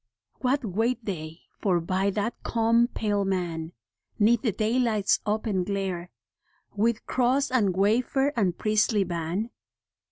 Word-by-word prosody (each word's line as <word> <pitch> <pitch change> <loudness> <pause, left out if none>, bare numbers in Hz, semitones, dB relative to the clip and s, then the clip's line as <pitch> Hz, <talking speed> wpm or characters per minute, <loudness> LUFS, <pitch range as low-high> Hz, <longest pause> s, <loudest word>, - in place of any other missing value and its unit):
What 260 0 0
wait 225 +4 -1
they 165 -4 -5 0.2
for 185 -4 +2
by 185 +4 0
that 210 +4 -1
calm, 230 +1 +2
pale 205 -4 -1
man, 175 -4 -2 0.5
'Neath 225 +2 +4
the 230 - +1
daylight's 220 -1 +1
open 210 -3 0
glare, 190 -2 -3 0.7
With 225 +2 +1
cross 260 +2 +1
and 205 -8 +2
wafer 250 +8 +2
and 190 -7 +1
priestly 215 -1 +2
ban? 175 +5 -3
210 Hz, 125 wpm, -26 LUFS, 185-235 Hz, 0.7 s, Neath